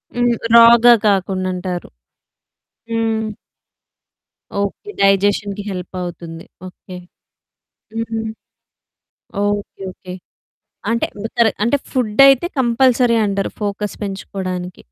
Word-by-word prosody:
హ్మ్. 240 0 +2 0.2
రా‌గా 235 +1 +8
కాకుండా 190 -1 0
అంటారు. 180 -1 -5 1.0
హ్మ్. 225 -1 0 1.4
ఓకే. 200 - -4
డైజెషన్‌కి 200 +1 +2
హెల్పవుతుంది. 175 -2 -7 0.2
ఓకే. 180 0 -11 1.0
హ్మ్. 225 0 -3 1.2
Okay 205 -1 -3
okay. 180 0 -10 0.8
అంటే 230 0 +1 0.2
మొత్తర 230 +1 +1 0.2
అంటే 240 +5 +2
ఫుడైతే 265 +5 +4
కంపల్సరీ 245 -1 +3
అంటారు. 200 -1 -2
ఫోకస్ 205 0 -3
పెంచుకోవడానికి. 185 -2 -5
205 Hz, 80 wpm, -18 LUFS, 185-235 Hz, 1.4 s, రా‌గా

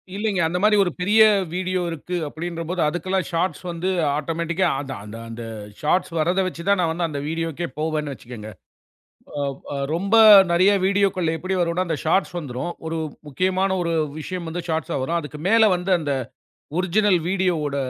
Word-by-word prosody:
இல்லைங்க. 205 -2 -1
அந்த 175 - -2
மாரி 210 0 +5
ஒரு 175 - -1
பெரிய 210 +5 +4 0.3
வீடியோ 185 0 -1
இருக்கு 165 +2 -5
அப்டின்ற 165 +3 -5
போது 180 -1 -1
அதுக்கெல்லாம் 185 +4 -1
ஷார்ட்ஸ் 175 +3 -1
வந்து 170 +2 -2 0.3
ஆட்டோமேட்டிக்கா 170 +4 -1
அது 135 -2 -6
அந்த 105 +2 -9
அந்த 115 +1 -7 0.4
ஷார்ட்ஸ் 170 +4 +1
வர்றத 180 +5 +2
வச்சு 170 -2 -6
தான் 200 -1 +4
நான் 170 - +1
வந்து 170 +1 -1
அந்த 145 -2 -4
வீடியோக்கே 165 +1 -3
போவேனு 155 -2 -1
வெச்சுக்கங்க. 115 -4 -9 1.1
அ - - -21 0.2
அ - - -3 0.2
ரொம்ப 195 +6 +1 0.4
நெறைய 185 +4 +5
வீடியோக்கள் 190 -4 +1
எப்படி 185 +3 -2
வரும்னா 175 +2 0
அந்த 160 -3 -1
ஷார்ட்ஸ் 175 +2 +1
வந்துரும். 140 +2 -4 0.2
ஒரு 165 0 -2 0.3
முக்கியமான 185 +5 +1
ஒரு 170 -1 -1 0.3
விஷயம் 175 +1 -5
வந்து 175 +1 -4
ஷார்ட்ஸ்ஸ 160 -4 -1
வரும். 170 +5 0
அதுக்கு 150 -1 -8
மேல 225 -1 +6
வந்து 180 +2 0
அந்த 145 -3 -1 0.7
ஒரிஜினல் 185 0 +2
வீடியோவோட 175 -7 0
170 Hz, 165 wpm, -22 LUFS, 155-185 Hz, 1.1 s, மேல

